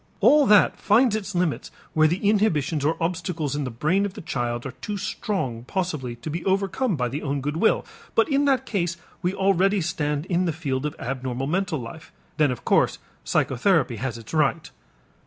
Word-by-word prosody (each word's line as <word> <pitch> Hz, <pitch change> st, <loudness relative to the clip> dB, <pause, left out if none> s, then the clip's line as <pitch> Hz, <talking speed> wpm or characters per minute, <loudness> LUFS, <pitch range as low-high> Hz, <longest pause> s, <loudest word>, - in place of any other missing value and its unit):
All 295 Hz, -2 st, +5 dB
that 210 Hz, -2 st, +5 dB
finds 225 Hz, +1 st, +4 dB
its 210 Hz, -2 st, -4 dB
limits 175 Hz, -4 st, 0 dB, 0.2 s
where 155 Hz, -1 st, +5 dB
the 180 Hz, +5 st, 0 dB
inhibitions 165 Hz, -9 st, +2 dB
or 160 Hz, +3 st, +1 dB
obstacles 165 Hz, -4 st, -2 dB
in 145 Hz, -1 st, -2 dB
the -, -, -3 dB
brain 155 Hz, -, +1 dB
of 200 Hz, -2 st, -3 dB
the -, -, -7 dB
child 120 Hz, -4 st, -3 dB
are 135 Hz, -, -4 dB
too 205 Hz, +8 st, -5 dB
strong 190 Hz, -, -3 dB
possibly 155 Hz, -8 st, -3 dB
to 120 Hz, -, -7 dB
be 170 Hz, +2 st, -4 dB
overcome 195 Hz, +3 st, 0 dB
by 125 Hz, -4 st, 0 dB
the 140 Hz, +5 st, -4 dB
own 140 Hz, -1 st, -2 dB
good 145 Hz, +3 st, -3 dB
will, 220 Hz, -, +2 dB, 0.3 s
but -, -, +4 dB
in 285 Hz, -1 st, +2 dB
that 265 Hz, -2 st, +2 dB
case 175 Hz, -5 st, -1 dB, 0.2 s
we 180 Hz, +1 st, -1 dB
already 195 Hz, +1 st, +3 dB
stand 150 Hz, -4 st, -1 dB
in 180 Hz, 0 st, +1 dB
the 165 Hz, -, 0 dB
field 145 Hz, -3 st, -2 dB
of 150 Hz, -, -7 dB
abnormal 130 Hz, 0 st, -3 dB
mental 180 Hz, +2 st, 0 dB
life 130 Hz, +6 st, -9 dB, 0.2 s
and -, -, -26 dB
then 150 Hz, -3 st, +4 dB
of 125 Hz, -, -6 dB
course -, -, +3 dB, 0.3 s
psychotherapy 135 Hz, -, +1 dB
has 120 Hz, +1 st, -3 dB
its 115 Hz, +4 st, -11 dB
right. 155 Hz, +1 st, +1 dB
165 Hz, 195 wpm, -24 LUFS, 135-195 Hz, 0.3 s, All